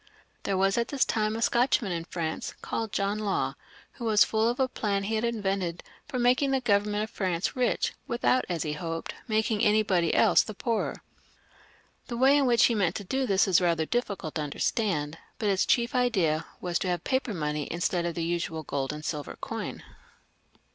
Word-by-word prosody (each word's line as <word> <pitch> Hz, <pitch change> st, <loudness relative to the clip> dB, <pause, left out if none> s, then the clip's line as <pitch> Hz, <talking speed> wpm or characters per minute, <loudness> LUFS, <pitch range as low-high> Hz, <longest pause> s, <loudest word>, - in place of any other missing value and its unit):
There 195 Hz, -, 0 dB
was 195 Hz, +3 st, +2 dB
at 235 Hz, -, 0 dB
this 280 Hz, -2 st, +1 dB
time 215 Hz, -1 st, 0 dB
a 230 Hz, -, -1 dB
Scotchman 240 Hz, -4 st, +2 dB
in 165 Hz, -1 st, -3 dB
France, 165 Hz, -2 st, -4 dB
called 225 Hz, -2 st, -3 dB
John 200 Hz, +2 st, -1 dB
Law, 205 Hz, -3 st, -1 dB, 0.4 s
who 240 Hz, -, -8 dB
was 215 Hz, -2 st, +5 dB
full 220 Hz, +1 st, +1 dB
of 245 Hz, -, -3 dB
a 265 Hz, -, +3 dB
plan 200 Hz, -5 st, -1 dB
he 215 Hz, +3 st, -2 dB
had 220 Hz, +1 st, 0 dB
invented 195 Hz, -7 st, -1 dB, 0.2 s
for 280 Hz, -3 st, -4 dB
making 250 Hz, +3 st, +3 dB
the 270 Hz, 0 st, +2 dB
Government 210 Hz, -3 st, +1 dB
of 220 Hz, -, -6 dB
France 180 Hz, -3 st, -1 dB
rich, 250 Hz, -1 st, +1 dB
without, 250 Hz, +2 st, +2 dB
as 170 Hz, -3 st, -1 dB
he 150 Hz, -2 st, -2 dB
hoped, 165 Hz, +1 st, -4 dB
making 220 Hz, -1 st, +1 dB
anybody 210 Hz, -6 st, +3 dB
else -, -, +5 dB
the 215 Hz, -, -7 dB
poorer. 230 Hz, +2 st, -2 dB, 1.0 s
The 235 Hz, -, -4 dB
way 265 Hz, +3 st, +5 dB
in 280 Hz, -2 st, +3 dB
which 240 Hz, -1 st, +5 dB
he 235 Hz, -, +3 dB
meant 190 Hz, -6 st, +1 dB
to 205 Hz, -, -4 dB
do 265 Hz, +7 st, -1 dB
this 195 Hz, 0 st, +3 dB
is 185 Hz, -2 st, +4 dB
rather 170 Hz, -2 st, +2 dB
difficult 200 Hz, -7 st, -2 dB
to 155 Hz, -, -2 dB
understand, 150 Hz, 0 st, -1 dB, 0.2 s
but 210 Hz, -, 0 dB
his 195 Hz, -1 st, +2 dB
chief 235 Hz, -2 st, +2 dB
idea 190 Hz, -12 st, +1 dB
was 175 Hz, -1 st, -1 dB
to -, -, -2 dB
have 175 Hz, -2 st, -1 dB
paper 260 Hz, -5 st, -1 dB
money 150 Hz, -2 st, -2 dB
instead 175 Hz, +1 st, 0 dB
of 170 Hz, -, -4 dB
the 170 Hz, -, -2 dB
usual 165 Hz, -1 st, -2 dB
gold 135 Hz, -2 st, -2 dB
and 150 Hz, +1 st, -7 dB
silver 150 Hz, -3 st, -4 dB
coin. -, -, -5 dB
200 Hz, 195 wpm, -28 LUFS, 170-235 Hz, 1.0 s, was